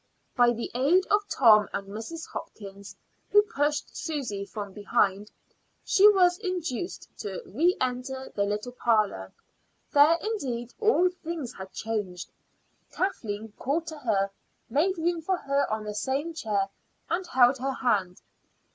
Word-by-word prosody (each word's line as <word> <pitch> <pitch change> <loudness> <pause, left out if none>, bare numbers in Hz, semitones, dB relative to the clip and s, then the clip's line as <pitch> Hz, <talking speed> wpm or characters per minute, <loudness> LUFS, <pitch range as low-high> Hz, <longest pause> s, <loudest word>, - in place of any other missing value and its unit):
By 245 -1 +5
the 235 0 -5
aid 305 +10 +3
of 415 0 +3
Tom 215 -5 +6
and 195 - -3
Mrs. 225 +11 -6
Hopkins, 200 -9 -9 0.3
who 415 0 +6
pushed 295 -6 -1
Susy 250 - -3
from 200 0 -7
behind, 205 -1 0 0.6
she 410 +1 +7
was 360 -3 +4
induced 360 - -4
to - - -4
re 355 -1 +2
enter 255 +1 -3
the 200 - 0
little 210 +4 -3
parlor. 215 - +1 0.6
There, 295 +3 +6
indeed, 255 - -3
all 425 -5 +4
things 335 -7 -5
had 190 0 -9
changed. 205 -5 -4 0.6
Kathleen 220 - -3
called 305 +6 -1
to 315 -2 -7
her, 200 -7 0 0.4
made 345 +8 +2
room 335 0 0
for 370 +3 0
her 280 -4 0
on 215 0 -2
the 210 0 -5
same 275 +9 -2
chair, 205 -9 -1 0.4
and 360 +1 -2
held 250 +1 +4
her 270 +1 -1
hand. 200 -9 0
255 Hz, 140 wpm, -27 LUFS, 210-335 Hz, 0.6 s, she